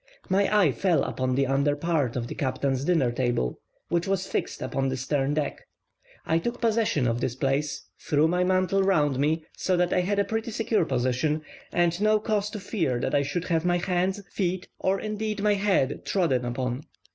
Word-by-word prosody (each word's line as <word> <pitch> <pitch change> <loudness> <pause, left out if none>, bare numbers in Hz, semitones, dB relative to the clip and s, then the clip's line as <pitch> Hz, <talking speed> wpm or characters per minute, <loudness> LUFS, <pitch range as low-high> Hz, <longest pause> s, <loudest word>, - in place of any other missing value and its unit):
My 195 +1 +2
eye 155 - +4
fell 180 +3 +1
upon 130 -1 -1
the 135 +1 +2
under 140 +2 +2
part 145 -5 0
of 120 -2 -2
the - - -6
captain's 135 0 -1
dinner 150 -7 +2
table, 120 - -1 0.3
which 170 +1 0
was 190 -1 0
fixed - - -3
upon 135 0 -1
the 130 - -2
stern 135 +2 0
deck; 150 -2 -2 0.6
I 165 - +2
took 240 +7 -3
possession 220 - +1
of 120 +1 0
this 120 - -1
place, 140 +2 -1 0.2
threw 150 +1 +2
my 180 +2 +1
mantle 185 +1 +2
round 150 -9 +2
me, 155 +2 +1
so 185 -1 0
that 175 0 +2
I - - +3
had 200 +3 -1
a 200 - +4
pretty 225 +1 -2
secure 220 -4 +1
position, 130 +4 0 0.3
and 175 +1 +1
no 215 0 +4
cause 210 -1 0
to 210 - -6
fear 170 - -1
that - - -2
I 145 - +4
should 155 +5 -2
have 165 -2 +2
my 175 0 +2
hands, 185 +2 0
feet, 185 -1 -2
or 190 +1 +1
indeed 215 -1 -3
my 210 -1 +4
head 195 -9 +1
trodden 135 -11 +1
upon. 125 +1 -2
165 Hz, 195 wpm, -26 LUFS, 135-195 Hz, 0.6 s, eye